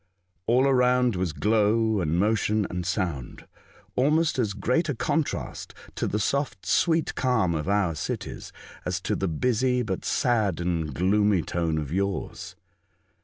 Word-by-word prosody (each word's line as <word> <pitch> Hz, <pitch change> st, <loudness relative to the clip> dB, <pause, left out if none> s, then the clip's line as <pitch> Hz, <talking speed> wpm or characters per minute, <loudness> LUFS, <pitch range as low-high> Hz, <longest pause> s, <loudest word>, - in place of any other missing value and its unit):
All 125 Hz, +3 st, +4 dB
around 125 Hz, -3 st, +3 dB
was 90 Hz, -2 st, -1 dB
glow, 110 Hz, +3 st, +2 dB
and 80 Hz, 0 st, 0 dB
motion, 105 Hz, +1 st, +1 dB
and 90 Hz, -1 st, -3 dB
sound; 85 Hz, -, -3 dB, 0.5 s
almost 150 Hz, +3 st, +2 dB
as 110 Hz, -5 st, 0 dB
great 125 Hz, -, 0 dB
a 145 Hz, -, -1 dB
contrast 155 Hz, +6 st, -2 dB, 0.2 s
to -, -, -2 dB
the 105 Hz, -, -1 dB
soft, 125 Hz, -1 st, -1 dB
sweet 165 Hz, -2 st, +2 dB
calm 120 Hz, -9 st, +1 dB
of 80 Hz, +3 st, -2 dB
our 100 Hz, -4 st, +2 dB
cities, 75 Hz, -, -5 dB, 0.3 s
as -, -, -2 dB
to -, -, -1 dB
the 95 Hz, -, -1 dB
busy, 125 Hz, -, +1 dB
but 95 Hz, -5 st, -3 dB
sad 110 Hz, -8 st, +1 dB
and 85 Hz, -3 st, -1 dB
gloomy 95 Hz, +3 st, +2 dB
tone 85 Hz, -2 st, -1 dB
of 75 Hz, -3 st, -4 dB
yours. 100 Hz, +1 st, -3 dB
105 Hz, 145 wpm, -26 LUFS, 90-125 Hz, 0.5 s, All